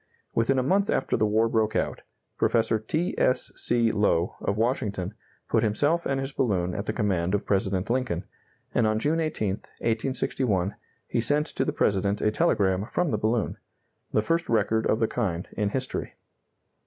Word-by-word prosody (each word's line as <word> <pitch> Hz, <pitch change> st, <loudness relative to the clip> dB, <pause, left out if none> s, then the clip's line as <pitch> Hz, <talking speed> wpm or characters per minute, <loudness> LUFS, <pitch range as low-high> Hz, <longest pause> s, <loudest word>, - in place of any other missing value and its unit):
Within 115 Hz, +4 st, +2 dB
a 130 Hz, -, +2 dB
month 195 Hz, +8 st, +2 dB
after -, -, +1 dB
the 110 Hz, -, +2 dB
war 110 Hz, +2 st, +3 dB
broke 110 Hz, -1 st, +1 dB
out, -, -, -1 dB, 0.3 s
Professor 115 Hz, -1 st, +2 dB
T. 155 Hz, +11 st, -1 dB
S. 125 Hz, -, +2 dB
C. 120 Hz, -2 st, +2 dB
Lowe, 100 Hz, -5 st, +1 dB
of 100 Hz, -, -1 dB
Washington, 105 Hz, -5 st, -1 dB, 0.3 s
put 110 Hz, -, +2 dB
himself 145 Hz, +11 st, +1 dB
and 135 Hz, -1 st, 0 dB
his 135 Hz, +1 st, -3 dB
balloon 95 Hz, -10 st, 0 dB
at 100 Hz, -, -4 dB
the -, -, +1 dB
command 95 Hz, -4 st, 0 dB
of 105 Hz, -, -2 dB
President 95 Hz, -1 st, 0 dB
Lincoln, 120 Hz, -8 st, -1 dB, 0.5 s
and 115 Hz, -, +3 dB
on 110 Hz, 0 st, +1 dB
June 150 Hz, +8 st, +1 dB
18, 155 Hz, -10 st, -1 dB, 0.3 s
1861, 110 Hz, -4 st, 0 dB, 0.3 s
he -, -, 0 dB
sent 145 Hz, +6 st, +2 dB
to -, -, -1 dB
the -, -, 0 dB
President 100 Hz, -6 st, +1 dB
a 105 Hz, -, +2 dB
telegram 100 Hz, -1 st, +2 dB
from 175 Hz, +4 st, 0 dB
the 105 Hz, -, 0 dB
balloon 110 Hz, 0 st, 0 dB, 0.5 s
the 110 Hz, -, +2 dB
first 165 Hz, +6 st, 0 dB
record 110 Hz, 0 st, +2 dB
of 110 Hz, -, +2 dB
the 115 Hz, -, +2 dB
kind 95 Hz, -8 st, -2 dB
in 105 Hz, -1 st, -1 dB
history. 130 Hz, +4 st, -3 dB
110 Hz, 175 wpm, -26 LUFS, 100-130 Hz, 0.5 s, war